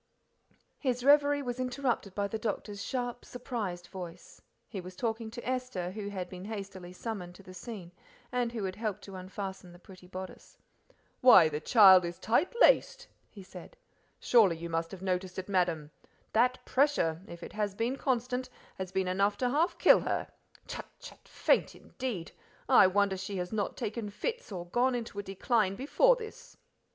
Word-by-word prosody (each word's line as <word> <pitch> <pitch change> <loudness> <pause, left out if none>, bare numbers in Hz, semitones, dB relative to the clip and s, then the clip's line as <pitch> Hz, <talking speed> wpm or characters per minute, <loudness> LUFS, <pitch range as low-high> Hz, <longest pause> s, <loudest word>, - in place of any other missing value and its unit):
His 250 -3 -1
reverie 285 0 +5
was 245 -1 -4
interrupted 250 -6 -1
by 200 -1 0
the 220 +2 -4
doctor's 205 -2 -4
sharp, 245 -2 -3
surprised 215 -8 -5
voice. 180 -2 -9 0.3
He 195 - -6
was 180 +1 -10
talking 225 +2 -2
to 240 +2 -8
Esther, 250 -9 -2
who 205 0 -5
had 185 -3 -4
been 185 +1 -9
hastily 195 -4 -7
summoned 180 -3 -6
to 195 - -14
the 185 - -12
scene, 185 -2 -8 0.4
and 245 -1 0
who 225 -3 -4
had 185 -1 -3
helped 210 -2 -3
to 195 0 -9
unfasten 190 0 -7
the 175 - -14
pretty 185 0 -15
bodice. 185 0 -9 0.6
"Why, 190 -11 +8
the 150 -1 -3
child 190 +1 +7
is 170 0 -4
tight 245 +10 +1
laced!" - - +4 0.2
he 200 - -12
said; - - -12 0.4
"surely 205 -9 +4
you 170 +1 -6
must 165 0 -1
have 190 -1 -9
noticed 185 -1 -2
it, 190 - -4
madam. 175 -6 0 0.4
That 250 +3 +2
pressure, 255 - +2
if 170 -3 -10
it - - -8
has 210 -2 -2
been 235 +5 -1
constant, 255 -1 -1 0.3
has 185 -1 -4
been 190 -1 0
enough 200 +2 +1
to 250 -1 0
half 320 +6 +1
kill - - +7
her. - - -2 0.4
Chut, - - -6
chut! - - -13
faint - - +1
indeed 235 -11 -5 0.4
I 190 - +7
wonder 195 0 +2
she 195 +1 -5
has 180 +3 -4
not 205 -2 -2
taken 220 -2 -3
fits 460 - -4
or 175 -3 -5
gone 245 +8 +1
into 230 -4 -5
a - - 0
decline 195 +1 0
before 400 - +4
this." 445 -3 -10
205 Hz, 175 wpm, -31 LUFS, 185-245 Hz, 0.6 s, Why